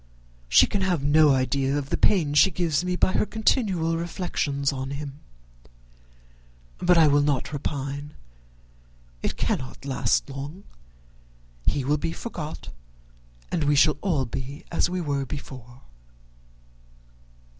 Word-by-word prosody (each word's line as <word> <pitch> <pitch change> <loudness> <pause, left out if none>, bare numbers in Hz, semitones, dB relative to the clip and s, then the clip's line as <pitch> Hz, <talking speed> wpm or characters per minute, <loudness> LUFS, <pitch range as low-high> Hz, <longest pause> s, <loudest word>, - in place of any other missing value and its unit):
she - - +7
can 200 - -2
have 180 -6 0
no 150 +1 +5
idea 135 +1 +1
of 140 -1 -4
the - - +3
pain 165 -8 +2
she 150 +6 +6
gives 170 -4 0
me 180 0 -1
by 185 - +2
her - - +2
continual 195 -8 +1
reflections 155 -5 -2
on 130 0 -4
him. 140 0 -6 1.6
But 180 0 +4
I 165 - +7
will 145 0 +4
not 145 0 0
repine. 145 0 -4 1.1
It - - -3
cannot 130 +1 -3
last 125 -4 +1
long. 140 +7 -7 1.0
He 140 -3 +1
will 145 +2 +2
be 165 +3 -3
forgot, 160 -9 -7 0.8
and 150 - 0
we 145 0 +3
shall 150 +1 +4
all 160 -9 0
be 135 +4 -6
as 175 - +1
we 180 0 -2
were 140 -4 -1
before." 130 -2 -9
145 Hz, 135 wpm, -25 LUFS, 135-170 Hz, 1.6 s, she